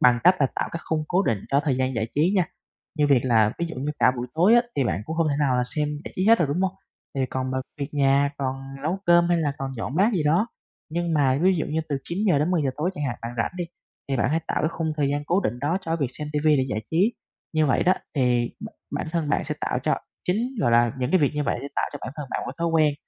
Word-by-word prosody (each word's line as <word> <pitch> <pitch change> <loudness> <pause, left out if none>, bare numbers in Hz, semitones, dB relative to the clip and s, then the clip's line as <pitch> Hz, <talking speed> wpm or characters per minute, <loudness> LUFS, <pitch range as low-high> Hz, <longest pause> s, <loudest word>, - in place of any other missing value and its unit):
bằng 125 -1 +5
cách 185 - +7
là 135 - +5
tạo - - -1
cái 165 - -4
khung 155 -1 -1
cố 185 +2 +2
định 115 - +1
cho 140 +1 +4
thời 140 -5 +1
gian 130 0 0
giải 115 0 -1
trí 160 +6 +3
nha. 180 - +4 0.5
Như 145 - +4
việc 130 - +6
là 110 -4 +4
ví 170 - -1
dụ 165 - -7
như 140 +4 -2
cả - - +5
buổi 120 - -3
tối 185 +8 +5
á 240 - +6
thì 135 - +2
bạn 95 -2 -1
cũng 160 - -4
hông 165 -2 +2
thể 140 - +1
nào 135 -4 +2
là 125 - +2
xem 150 +4 -1 0.2
giải - - -7
trí 185 - +1
hết 230 +1 +7
rồi, 160 -5 +1
đúng 160 +6 -1
hông? 190 -1 +1 0.4
Thì 135 - -1
còn 130 0 -2
mà 130 - -1 0.2
việc 140 - -2
nhà, 140 0 +3
còn 130 -1 -1 0.3
nấu 170 +6 -1
cơm, 175 0 +5
hay 175 - +3
là 150 -3 0
còn 135 0 -3
dọn 120 +4 -4
bát 210 +5 +4
gì 170 - +1
đó. 170 +9 +3 0.4
Nhưng 170 0 -1
mà 135 -3 +3
ví 190 0 +5
dụ 155 - -1
như 160 +2 -1
từ 145 - 0
9:00-10:00 170 -5 +1
tối 165 +5 0
chẳng 150 -4 -3
hạn 120 -3 -2
bạn 115 - -4
rảnh 115 - -1
đi, 175 - -2 0.4
thì 135 - 0
bạn 125 - +1
hãy 165 +1 +1
tạo - - -1
cái 155 - +2
khung 160 -2 -2
thời 145 -2 +1
gian 145 0 -1
cố 180 +5 +2
định 120 - -2
đó 155 +8 0
cho 165 -2 -2
việc 140 -5 0
xem 150 0 -4
ti 150 - +1
vi 155 -2 +5
để 130 - +2
giải 110 -2 -2
trí. 190 +9 +3 0.4
Như 155 -1 +3
vậy 135 - +2
đó, 185 - +4 0.2
thì 125 -4 +2
bả - - -8 0.2
bản - - -2
thân 165 -4 -1
bạn - - +1
sẽ - - -2
tạo - - -1
cho - - +2 0.3
chính, 230 +8 0
gọi 120 - +2
là, 120 0 +4
những 125 +2 -1
cái 185 - +5
việc 145 - +3
như 150 - 0
vậy 120 - -1
sẽ 140 - -6
tạo - - +1
cho 145 - -6
bản 130 - -6
thân 150 - -5
bạn - - -1
một - - -6
cái - - -5
thói 170 - 0
quen. 155 -3 +3
150 Hz, 295 wpm, -24 LUFS, 130-170 Hz, 0.5 s, cách